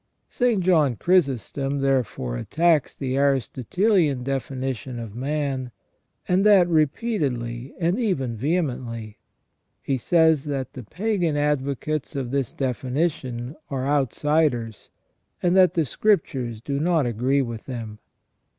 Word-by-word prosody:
St. 240 -6 +1
John 155 -8 +3
Chrysostom 140 - +1
therefore 130 - 0
attacks 160 - +1
the 130 -1 -2
Aristotelian 140 - +1
defi 135 0 -3
nition 130 -1 -4
of 115 -3 -7
man, 135 0 -2 0.6
and 185 +2 +3
that 200 -4 +6
repeatedly 140 - -1
and 175 +6 +1
even 135 - -1
vehemently. 120 -6 -2 0.6
He 135 -2 -2
says 160 0 +3
that 135 -3 -3
the 130 - -7
pagan 175 - -1
advocates 145 0 -1
of 130 -3 -3
this 135 -4 -1
definition 130 -1 -2
are 135 -2 -2
outsiders, 140 -4 0 0.5
and 175 0 +3
that 185 -1 +5
the 165 -3 +2
Scriptures 130 - 0
do 140 +3 -2
not 160 -2 +2
agree 125 +4 +1
with 115 -3 -7
them. 115 -5 -6
140 Hz, 120 wpm, -24 LUFS, 125-160 Hz, 0.6 s, that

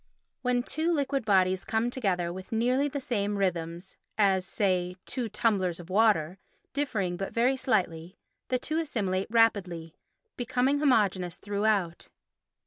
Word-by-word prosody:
When 245 -1 +1
two 315 +6 0
liquid 280 -5 0
bodies 185 -2 +3
come 225 +2 0
together 180 -9 -1
with 185 +1 -9
nearly 250 +5 +2
the 285 0 -3
same 205 -6 -1
rhythms, 175 -1 -2 0.2
as, 190 -3 +3
say, 180 -3 0
two 245 -3 -3
tumblers 195 -5 0
of 175 +1 -10
water, 190 -4 +3 0.3
differing 210 -11 -1
but 195 - -5
very 245 +3 +3
slightly, 180 -9 -1 0.3
the 255 - +1
two 310 +5 -2
assimilate 195 - -1
rapidly—becoming 225 - 0
homogeneous 195 - +2
throughout. 205 -4 -1
205 Hz, 130 wpm, -28 LUFS, 185-250 Hz, 0.3 s, bodies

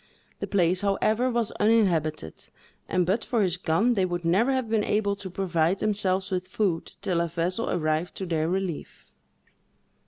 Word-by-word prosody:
The - - -3
place, 185 -1 +1
however, 215 +5 +1
was 235 -3 0
uninhabited, 170 - +1 0.4
and 180 -1 +2
but 200 +6 0
for 230 -4 +1
his 180 -3 +1
gun, 180 +8 +2
they 195 -5 +1
would 175 -1 -2
never 200 +10 +3
have 260 -3 0
been 220 -1 +1
able 205 -1 +1
to 195 -2 -7
provide 180 -1 0
themselves 195 -2 0
with 185 0 -2
food 185 -6 -1
till 175 -2 +1
a 170 - 0
vessel 170 +6 -2
arrived 155 +1 -1
to 190 - -4
their 165 -2 0
relief. 185 -4 -4
185 Hz, 165 wpm, -26 LUFS, 170-210 Hz, 0.4 s, never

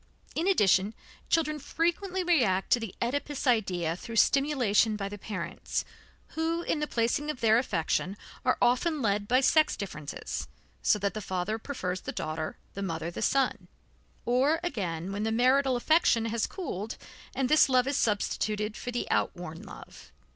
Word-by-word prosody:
In 335 - -1
addition, 205 - +3 0.3
children 305 -2 +1
frequently 345 +6 -1
react 235 - +2
to 245 - +5
the 225 -5 -6
Oedipus 285 +3 -2
idea 185 - +1
through 230 +5 -8
stimulation 245 -5 +3
by 200 -2 -3
the 205 +1 -8
parents, 185 -5 -4 0.4
who 330 +1 -1
in 315 - -1
the 300 - -1
placing 240 +6 0
of 300 - -3
their 225 0 +5
affection 195 -3 -1 0.3
are 255 - +2
often 270 +4 +2
led 205 -1 +1
by 255 +3 +4
sex 310 +3 +4
differences, 155 -8 -5 0.3
so - - +3
that 200 -1 -1
the 215 - -4
father 190 +3 -2
prefers 185 -9 -4
the - - -5
daughter, 155 0 -4 0.2
the 200 - -5
mother 165 -3 -3
the - - -6
son; 255 -8 +1 0.6
or 270 +7 +3
again, 185 - -3
where 200 +1 -3
the 220 +1 0
marital 255 +3 +3
affection 245 -3 +3
has 230 0 0
cooled, 225 - -5 0.4
and 265 -1 +1
this 305 0 +5
love 255 -1 +4
is 275 +1 -1
substituted 210 0 0
for 245 - -6
the 245 0 -2
outworn 165 -2 -1
love. - - -12
230 Hz, 160 wpm, -29 LUFS, 195-280 Hz, 0.6 s, to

